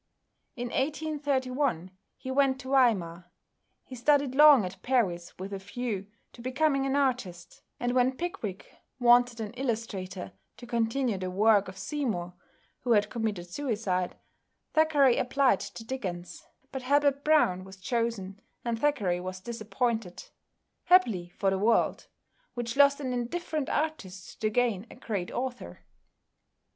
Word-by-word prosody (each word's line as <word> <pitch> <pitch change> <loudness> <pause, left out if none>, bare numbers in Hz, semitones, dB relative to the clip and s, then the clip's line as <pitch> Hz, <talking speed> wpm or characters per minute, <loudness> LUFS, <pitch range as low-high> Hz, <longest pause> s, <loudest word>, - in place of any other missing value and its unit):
In 245 0 -4
1831 275 - -1 0.3
he 260 - -6
went 265 -1 +2
to 260 - -8
Weimar. 180 -10 +2 0.5
He - - -13
studied 275 +2 +2
long 290 -6 +7
at 185 +1 -8
Paris 190 -10 0
with 195 +2 -6
a 195 - -4
view 200 0 -4 0.3
to 235 - -12
becoming 275 +2 +1
an 270 - 0
artist, 220 -12 -2 0.2
and 245 0 0
when 255 +1 +2
"Pickwick" 330 - -4 0.3
wanted 245 -1 +5
an 215 -2 -4
illustrator 220 -7 -4 0.3
to 245 - -10
continue 235 -1 0
the 185 0 -3
work 205 +1 +3
of 190 0 -9
Seymour 195 - -3 0.5
who 245 -2 +1
had 210 -1 +2
committed 215 -7 -2
suicide, 200 -5 -2 0.6
Thackeray 295 -5 +4
applied 255 -4 +2
to 205 +3 -8
Dickens, 180 -8 -6 0.2
but 265 - -4
Hablot 280 +1 +2
Browne 240 -13 +3
was 190 0 -12
chosen, 210 -2 -2 0.2
and 230 -1 -1
Thackeray 220 -11 +1
was 185 +1 -6
disappointed 225 -1 -3 0.5
happily 225 - +4
for 195 -1 +2
the 190 - 0
world, 225 +4 +2 0.5
which 235 -1 -3
lost 280 0 +5
an 260 -3 -3
indifferent 290 +4 -3
artist 200 -13 -4
to 215 - +2
gain 225 -2 0
a - - -12
great 195 -6 -4
author. 250 0 -5
235 Hz, 135 wpm, -28 LUFS, 190-265 Hz, 0.6 s, long